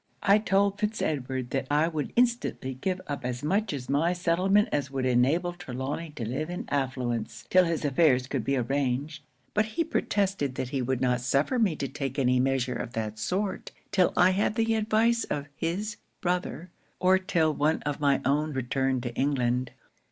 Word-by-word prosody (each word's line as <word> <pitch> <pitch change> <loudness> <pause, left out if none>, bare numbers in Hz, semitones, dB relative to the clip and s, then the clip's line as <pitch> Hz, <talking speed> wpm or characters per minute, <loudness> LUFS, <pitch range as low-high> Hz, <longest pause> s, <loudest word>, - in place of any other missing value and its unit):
'I 205 +1 +5
told 200 -1 +1
Fitz 215 +1 -1
Edward 130 -4 -2
that 135 -1 -1
I 150 +2 +3
would 155 -3 -3
instantly 235 - +1
give 180 +8 -2
up 145 -4 -5
as 125 0 -3
much 195 +7 +1
of 135 -4 -5
my 155 +6 +2
settlement 185 +5 +2
as 140 -2 -1
would 135 -2 -2
enable 140 +9 +2
Trelawny 145 -1 -5
to 115 - -4
live 135 +7 -3
in 180 - -4
affluence, 125 -5 -2
till 185 -1 +6
his 165 -2 -1
affairs 135 -3 +3
could 130 -2 -2
be 135 0 0
arranged; 140 +4 -1 0.3
but 215 +1 +2
he 335 - +3
protested 195 - -1
that 130 - -3
he 135 0 -1
would 130 0 -1
not 125 -1 +1
suffer 140 - +1
me 200 -8 +2
to 140 - -3
take 135 0 -4
any 125 -2 +3
measure 130 -1 +1
of 120 -1 -5
that 110 -1 -4
sort, 190 - -2 0.2
till 185 -2 +3
I 180 +1 +6
had 205 +3 +1
the 225 0 +2
advice 225 +2 +2
of 145 -1 -3
his 195 +8 -3 0.2
brother: 180 -1 -2 0.3
or, 185 +1 +4
till 170 -5 +1
one 150 +2 +1
of 145 -1 -2
my 140 -2 +2
own 150 +2 +1
returned 130 0 0
to 120 -2 -4
England. 125 -2 0
145 Hz, 185 wpm, -28 LUFS, 130-185 Hz, 0.3 s, till